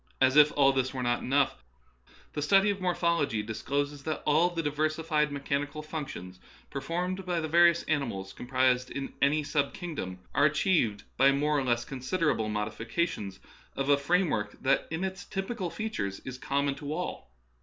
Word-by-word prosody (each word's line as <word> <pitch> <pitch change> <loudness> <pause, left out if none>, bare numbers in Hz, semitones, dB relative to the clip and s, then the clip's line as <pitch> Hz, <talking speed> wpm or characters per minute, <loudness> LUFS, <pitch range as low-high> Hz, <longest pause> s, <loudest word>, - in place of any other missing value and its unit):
As 130 0 +4
if 150 0 +7
all 140 -1 +5
this 130 0 -1
were 125 - -2
not 120 0 +1
enough, 140 +1 +1 0.7
the 150 - -2
study 195 +7 +4
of 200 -1 -5
morphology 170 -10 +1
discloses 140 +6 -2
that 155 +2 -3
all 155 +4 +4
the 170 -2 -3
diversified 155 0 0
mechanical 145 +1 -2
func 155 -2 -4
tions 90 -7 -9 0.3
performed 180 +6 -2
by 180 -2 -1
the 160 - -2
various 170 +1 +5
animals 115 -11 -2
comprised 130 0 +1
in 140 -1 -5
any 150 +2 +3
sub 145 -1 0
kingdom 150 - -5 0.2
are 140 +2 +4
achieved 150 - +2
by 135 +1 +6
more 150 +2 +1
or 140 - +2
less 120 -2 0
considerable 135 -3 -1
modifications 110 - -2 0.4
of 135 +1 -2
a 145 - +7
framework 140 - +1
that 140 +1 +2
in 160 +3 -3
its 190 -1 -4
typical 195 -1 -3
features 170 - -3
is 130 -1 -7
common 140 +1 0
.to 145 +1 -7
all. 180 - -4
145 Hz, 165 wpm, -29 LUFS, 130-165 Hz, 0.7 s, if